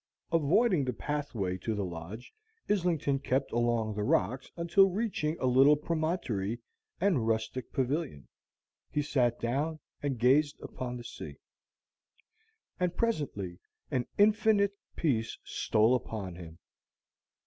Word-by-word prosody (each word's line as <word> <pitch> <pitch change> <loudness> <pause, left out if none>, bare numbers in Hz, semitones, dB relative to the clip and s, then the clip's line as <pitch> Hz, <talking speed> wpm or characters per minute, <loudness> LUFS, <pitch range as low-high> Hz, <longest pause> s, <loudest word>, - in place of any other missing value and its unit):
Avoiding 165 - +3
the 125 - -1
pathway 115 -7 -3
to 110 +4 -2
the 100 -2 -1
lodge, 90 +7 -8 0.3
Islington 170 -8 +1
kept 135 0 0
along 120 -2 +1
the 105 - -3
rocks 130 +4 +1
until, 180 +3 +5
reaching 185 -6 -1
a - - -1
little 135 +4 +6
promontory 150 - -1 0.4
and 160 - +2
rustic 110 +3 -1
pavilion, 135 - -2 0.6
he 150 - 0
sat 125 -5 +1
down 145 +7 -1 0.2
and 140 -3 -1
gazed 140 +5 +3
upon 125 -1 -5
the 120 - -8
sea. 115 - -8 1.4
And 180 -1 0
presently 135 - -1 0.3
an 125 -2 0
infinite 205 -1 +4 0.2
peace 115 -8 0
stole 110 +3 +2
upon 110 -7 -3
him. 85 -2 -10
130 Hz, 120 wpm, -30 LUFS, 110-160 Hz, 1.4 s, little